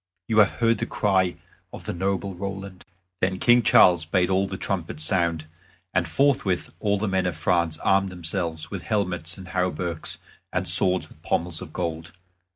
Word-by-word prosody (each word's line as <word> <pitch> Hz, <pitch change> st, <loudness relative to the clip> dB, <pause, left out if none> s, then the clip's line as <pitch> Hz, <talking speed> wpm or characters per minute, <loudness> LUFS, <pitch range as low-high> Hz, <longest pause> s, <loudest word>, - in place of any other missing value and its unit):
You 110 Hz, -1 st, +3 dB
have 95 Hz, -7 st, +5 dB
heard 115 Hz, +9 st, +2 dB
the -, -, -2 dB
cry 95 Hz, -4 st, +1 dB, 0.4 s
of -, -, -10 dB
the -, -, -3 dB
noble 95 Hz, +2 st, -1 dB
Roland." 95 Hz, 0 st, -6 dB, 0.4 s
Then 95 Hz, 0 st, 0 dB
King 120 Hz, +4 st, +5 dB
Charles 90 Hz, -6 st, +6 dB
bade 90 Hz, +3 st, +1 dB
all 95 Hz, +1 st, +2 dB
the 95 Hz, 0 st, -5 dB
trumpets 80 Hz, -6 st, -3 dB
sound, 85 Hz, -3 st, +1 dB, 0.5 s
and 90 Hz, -1 st, +1 dB
forthwith 100 Hz, -, +1 dB
all 100 Hz, -1 st, +1 dB
the 110 Hz, +2 st, -2 dB
men 95 Hz, -1 st, +1 dB
of 90 Hz, -, -3 dB
France 85 Hz, -3 st, +1 dB
armed 95 Hz, 0 st, +3 dB
themselves, 85 Hz, -2 st, -4 dB
with -, -, -4 dB
helmets, 90 Hz, -5 st, -1 dB
and 95 Hz, -1 st, -10 dB
hauberks, 90 Hz, -3 st, -2 dB, 0.3 s
and 95 Hz, 0 st, -1 dB
swords 90 Hz, +2 st, +2 dB
with -, -, -20 dB
pommels 85 Hz, 0 st, -1 dB
of 90 Hz, -4 st, -8 dB
gold. 85 Hz, -1 st, -4 dB
90 Hz, 170 wpm, -25 LUFS, 85-100 Hz, 0.5 s, Charles